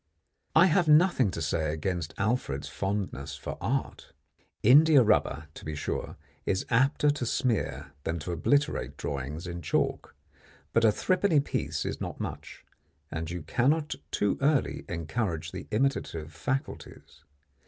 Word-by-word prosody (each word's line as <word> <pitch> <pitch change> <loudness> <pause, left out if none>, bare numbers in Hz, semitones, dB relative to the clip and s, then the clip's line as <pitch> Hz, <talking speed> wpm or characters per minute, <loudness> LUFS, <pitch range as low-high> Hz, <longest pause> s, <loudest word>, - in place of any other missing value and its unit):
I 165 +3 +8
have 180 -1 +3
nothing 150 - +5
to 85 -3 -4
say 80 0 0
against 80 0 -3
Alfred's 110 - -1
fondness 95 -9 -3
for - - -6
art. - - -3 0.5
India 145 +3 +7
rubber 105 -7 +2
to - - -11
be 80 -1 -4
sure, 75 - -4 0.3
is 95 - -1
apter 135 +4 +3
to 145 - -3
smear 120 -1 -1
than 80 - -2
to 90 - -4
obliterate 145 - 0
drawings 70 +5 -4
in 85 -1 -5
chalk; 75 - -1 0.6
but 115 - +3
a 110 - +6
three 185 - +1
penny 180 -5 +3
piece 140 - -2
is - - -4
not - - -5
much; - - -7 0.5
and 80 0 -4
you 85 -2 -5
cannot 145 - +1 0.2
too 105 - 0
early 140 0 +1
encourage 85 +1 -2
the - - -7
imitative 105 - -1
faculties. 130 - -5
105 Hz, 145 wpm, -28 LUFS, -, 0.6 s, I